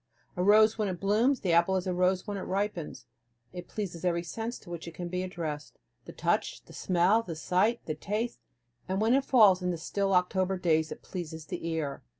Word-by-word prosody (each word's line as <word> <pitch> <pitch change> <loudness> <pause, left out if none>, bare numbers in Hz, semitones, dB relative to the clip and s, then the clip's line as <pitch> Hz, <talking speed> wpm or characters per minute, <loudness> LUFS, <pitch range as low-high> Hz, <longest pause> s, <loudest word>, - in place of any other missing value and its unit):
A 180 - -2
rose 215 +3 +5
when 210 - +1
it 180 -2 -4
blooms, 225 +7 +2
the 185 - 0
apple 170 +3 +4
is 185 0 -1
a 185 - -1
rose 180 +1 +1
when 205 -2 -4
it 195 - -4
ripens. 185 - -3 0.5
It 180 -1 -7
pleases 185 -6 -5
every 170 -1 +1
sense 225 +6 -5
to 175 - -13
which 170 -1 -6
it 170 - -8
can 175 +1 -5
be 180 +1 -2
addressed, 165 -5 -5 0.3
the - - -9
touch, - - -1
the - - -15
smell, 185 +5 +2
the 175 -7 -6
sight, 185 +8 +1
the 155 - -2
taste; 210 +9 -3 0.5
and 190 +1 0
when 225 +3 +3
it 270 +1 +3
falls 210 -9 +5
in 180 - -1
the 175 - -1
still 195 +3 -1
October 185 +1 +1
days 160 -3 +1
it - - -8
pleases 160 -4 -6
the 165 - -5
ear. 160 -4 -3
185 Hz, 215 wpm, -29 LUFS, 170-205 Hz, 0.5 s, rose